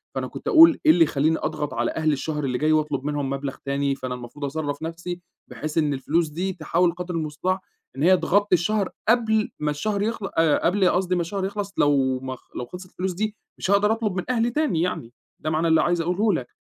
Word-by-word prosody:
فأنا - - -2
كنت - - -9
أقول 330 -3 +7
إيه - - +8
اللي 165 +1 +5
يخلّيني 155 +2 +1
أضغط 150 -3 -3
على 120 -1 0
أهلي 155 -1 +1
الشهر 150 +1 -3
اللي 125 -2 -1
جاي 155 +4 +1
واطلب 150 -3 +1
منهم 145 -2 -1
مبلغ 140 0 -3
تاني، 140 0 0
فأنا 130 -2 -5
المفروض 125 +4 -7
أصرّف 145 0 -3
نفسي 170 +2 -5 0.3
بحيث 155 +1 -6
إن 150 -3 +2
الفلوس 155 +5 0
دي 185 +5 -3
تحاول 170 +1 +1
قدر 180 0 -5
المُستطاع 165 +4 -1 0.4
إن 140 - -3
هي 185 +2 +6
تغطّي 205 +1 +2
الشهر 200 +2 0 0.2
قبل 220 -2 +3
ما 150 0 0
الشهر 200 +7 -2
يخل 220 -1 -2
أ 165 -2 +3
قبل 185 +1 +3
قصدي 180 0 +1
ما 175 - +1
الشهر 190 +3 -3
يخلص 200 0 -4
لو 135 -3 +2
ما 130 0 -5
خ - - -24
لو 125 - -4
خلصت 180 +7 -10
الفلوس 185 +1 -3
دي 215 +3 -2 0.2
مش 190 - -2
هاقدر 205 +1 +4
أطلب 220 -4 -1
من 185 - -1
أهلي 240 -1 +2
تاني 245 - 0
يعني. 125 -10 -3 0.3
ده 155 - -3
معنى 160 +2 +1
اللي 160 - +4
عايز 175 -1 +1
أقوله 185 +5 +1
لك. 130 -7 -2
165 Hz, 220 wpm, -24 LUFS, 145-190 Hz, 0.4 s, إيه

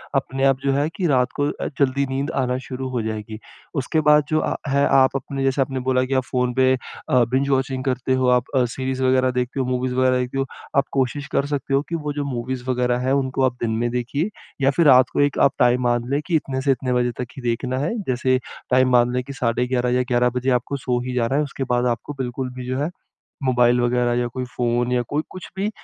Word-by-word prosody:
अपने 135 0 -1
आप 135 -1 +3
जो 140 - +3
है 145 +2 +1
कि 180 -1 0
रात 125 -4 +2
को 145 0 +2
अ, - - -5
जल्दी 140 0 +2
नींद 135 +1 -2
आना 125 0 -1
शुरू 130 0 -4
हो 125 -2 -2
जाएगी। 110 0 -5 0.4
उसके 155 +5 0
बाद 150 0 +6
जो 155 - +2
अ, - - -1
है 140 +1 +3
आप 135 0 +4
अपने, 135 0 -3
जैसे 135 +1 +1
आपने 135 -1 -1
बोला 130 0 +3
कि 130 0 +1
फ़ोन 125 -1 0
पे 130 0 +4
अ, 125 0 -1
बिंज 135 +2 +1
वॉचिंग 130 -1 0
करते 130 0 0
हो, 130 0 +1
आप 125 0 +4
अ, 130 - +4
सीरीज़ 130 +2 -3
वगैरह 130 0 +3
देखते 125 +2 -4
हो, 130 - +1
मूवीज़ 125 0 -1
वगैरह 130 0 +3
देखते 125 +2 -3
हो 135 - +1 0.3
आप 140 - +5
कोशिश 140 +1 -1
कर 140 - +1
सकते 145 -1 -3
हो 135 - +4
कि 170 - -2
वो 150 -2 -3
जो 145 0 -2
मूवीज़ 125 -1 -4
वगैरह 125 -1 +1
हैं, 130 - +2
उनको 135 -1 0
आप 130 - +1
दिन 115 - 0
में 120 0 0
देखिए। 125 - -1 0.3
या 135 - +4
फिर 160 +4 +2
रात 130 -1 +7
को - - -1
एक 145 -1 +1
आप 140 - +5
टाइम 125 0 +4
मान 120 -1 +1
लें 140 - +1
कि 170 - 0
इतने 135 -3 -1
से 140 - +2
इतने 130 -1 -1
बजे 125 0 +1
तक 125 - -4
ही - - -6
देखना 125 +2 -1
है। 145 +4 -1 0.2
जैसे 130 0 +2 0.3
टाइम 130 0 +4
मान 120 0 +4
लें 125 - 0
कि 140 - -8
साढ़े 125 -1 0
11 125 -1 0
या 125 - +3
11 125 0 +3
बजे 130 +2 0
आपको 140 +4 -5
सो 125 -2 -1
ही 130 - -3
जाना 125 +2 0
है। 150 - +3
उसके 140 -2 -4
बाद 125 0 +2
आपको 145 - -9
बिल्कुल 130 0 -3
भी 125 0 -7
जो 130 +1 -2
है 150 +3 0 0.6
मोबाइल 125 -1 +3
वगैरह 120 0 +1
या 120 - 0
कोई 125 +2 -4
फ़ोन, 120 0 0
या 125 -1 +2
कोई 145 +6 -2
कुछ 185 - -9
भी 195 +2 0
130 Hz, 250 wpm, -22 LUFS, 125-135 Hz, 0.6 s, रात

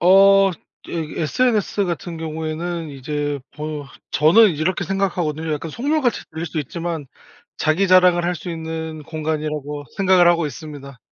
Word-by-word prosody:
어. 195 +2 +6 0.4
예. 160 -1 -3
SNS 210 - +1
같은 175 -1 -4
경우에는 160 +1 -4
이제 145 +1 -3 0.2
보여 150 -1 -5 0.3
저는 185 +7 +6
이렇게 175 +5 -1
생각하거든요. 170 -4 -1
약간 150 +2 -3
속물같이 275 - 0
들릴 160 +1 -5
수 160 -1 -2
있지만 165 +1 -4 0.5
'자기 180 +5 +1
자랑을 180 -1 +5
할 175 0 0
수 175 +3 -7
있는 160 -1 -5
공간.'이라고 150 -2 -3
생각을 185 -2 +5
하고 170 -2 +3
있습니다. 145 -3 -9
160 Hz, 330 characters per minute, -21 LUFS, 155-180 Hz, 0.5 s, 어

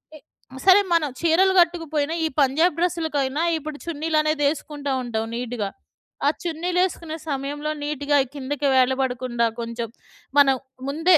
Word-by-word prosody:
ఎ - - -12 0.5
సరే 385 +1 +8
మనం 320 -3 +2
చీరలు 345 +3 +4
కట్టుకుపోయిన, 320 -4 +1
ఈ - - +3
పంజాబ్ 300 +5 +3
డ్రెస్‌ల‌కై‌న 315 -6 0 0.2
ఇప్పుడు 305 -1 -6
చున్నీలనే‌ది 310 -2 0
ఏసుకుంట 295 -2 -7 0.2
ఉంటాం 225 -2 -2
నీట్‌గా. 235 -4 -3 0.6
ఆ - - +7
చున్నీలు 350 +1 -1
ఏసుకునే 330 -3 -6
సమయంలో 290 +2 -3
నీట్‌గా 290 0 +1 0.2
కిందకి 285 +1 -2
వేలబడకుండా, 255 -2 +1
కొంచెం 230 0 -4 0.5
మనం 270 -2 +6 0.3
ముందే 325 +4 +4
295 Hz, 125 wpm, -23 LUFS, 265-325 Hz, 0.6 s, సరే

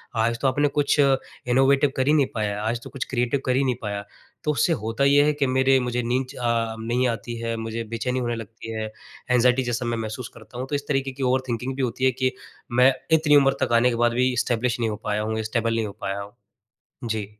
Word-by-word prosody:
आज 115 +1 +1
तो 135 - +2
आपने 145 +2 +2
कुछ 145 0 +2
इनोवेटिव 135 0 +2
कर 130 - +1
ही 150 - +5
नहीं 145 -3 +4
पाया, 105 -1 -1
आज 115 +2 -1
तो - - -9
कुछ 135 -2 -4
क्रिएटिव 125 +2 0
कर 130 -1 +2
ही 135 - +2
नहीं 130 -2 +1
पाया। 100 -1 -3 0.4
तो 150 - +1
उससे 165 +3 +2
होता 115 +1 -2
ये 140 +1 +5
है 150 - +3
कि 145 -2 0
मेरे 130 +1 +3
मुझे 125 -1 -1
नींद 125 +3 0
च - - -13
अ, 115 -2 0
नहीं 120 +3 0
आती 120 +1 -4
है, 115 0 -2
मुझे 115 +1 -4
बेचैनी 125 +3 -1
होने 120 -1 -1
लगती 115 0 -8
है, 110 -1 -3 0.5
एंज़ाइटी 125 +1 +4
जैसा 120 0 -2
मैं 120 0 -1
महसूस 115 +2 -5
करता 115 +2 -11
हूँ, 130 - -4
तो 145 - -2
इस 145 0 -4
तरीक़े 135 -1 0
की 135 +1 -6
ओवरथिंकिंग 130 0 -1
भी 135 - -3
होती 130 +1 -1
है 130 - +5
कि 130 - +3 0.4
मैं 125 +2 +5 0.2
इतनी 150 -2 +3
उम्र 135 -1 +4
तक 120 - 0
आने 115 +2 +5
के 120 - -1
बाद 120 - +3
भी 125 +1 +2
इस्टैब्लिश 120 0 0
नहीं 115 - +1
हो 105 - -3
पाया 105 0 -1
हूँ, 110 +1 -2
स्टेबल 115 +1 0
नहीं 115 -1 0
हो - - -6
पाया 100 0 -2
हूँ, 100 +1 -10 0.7
जी। 110 -3 -2
125 Hz, 240 wpm, -24 LUFS, 115-135 Hz, 0.7 s, ही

